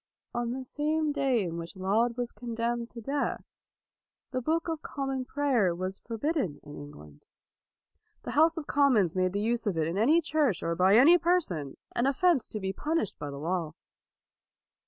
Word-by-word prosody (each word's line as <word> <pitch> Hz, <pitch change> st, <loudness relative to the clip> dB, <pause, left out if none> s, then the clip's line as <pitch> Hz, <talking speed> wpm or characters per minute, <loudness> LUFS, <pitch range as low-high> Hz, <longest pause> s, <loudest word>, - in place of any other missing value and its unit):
On 240 Hz, 0 st, -1 dB
the 260 Hz, +2 st, -4 dB
same 305 Hz, +3 st, 0 dB
day 270 Hz, -6 st, +1 dB
in 170 Hz, -2 st, -4 dB
which 170 Hz, +4 st, -7 dB
Laud 220 Hz, +6 st, +1 dB
was 245 Hz, -1 st, -2 dB
condemned 235 Hz, 0 st, -3 dB
to 235 Hz, -, -9 dB
death, 280 Hz, +5 st, -3 dB, 0.8 s
the 255 Hz, -1 st, -2 dB
Book 325 Hz, +6 st, 0 dB
of 325 Hz, -2 st, -3 dB
Common 270 Hz, -2 st, -3 dB
Prayer 250 Hz, -11 st, +1 dB
was 185 Hz, +2 st, -4 dB
forbidden 235 Hz, -, -2 dB
in 145 Hz, 0 st, -10 dB
Eng 145 Hz, 0 st, -9 dB
land. 75 Hz, -1 st, -15 dB, 1.0 s
The -, -, -5 dB
House 320 Hz, +3 st, +4 dB
of 315 Hz, -, -4 dB
Commons 250 Hz, -, +3 dB
made 185 Hz, 0 st, +1 dB
the 200 Hz, -, -3 dB
232 210 Hz, -, -1 dB
LAUD 230 Hz, -, +1 dB
use 240 Hz, -2 st, -1 dB
of 190 Hz, -5 st, 0 dB
it 160 Hz, -1 st, +1 dB
in 180 Hz, +5 st, -1 dB
any 300 Hz, +9 st, +5 dB
church 300 Hz, -, 0 dB
or 165 Hz, -, 0 dB
by 185 Hz, +4 st, +4 dB
any 320 Hz, +9 st, +7 dB
person 295 Hz, -, 0 dB, 0.2 s
an 240 Hz, -, +2 dB
offense 295 Hz, 0 st, +2 dB
to 215 Hz, -, -5 dB
be 190 Hz, -1 st, -3 dB
punished 305 Hz, -, -2 dB
by 145 Hz, -, -5 dB
the 140 Hz, -, -7 dB
law. 160 Hz, 0 st, -2 dB
235 Hz, 190 wpm, -29 LUFS, 185-290 Hz, 1.0 s, any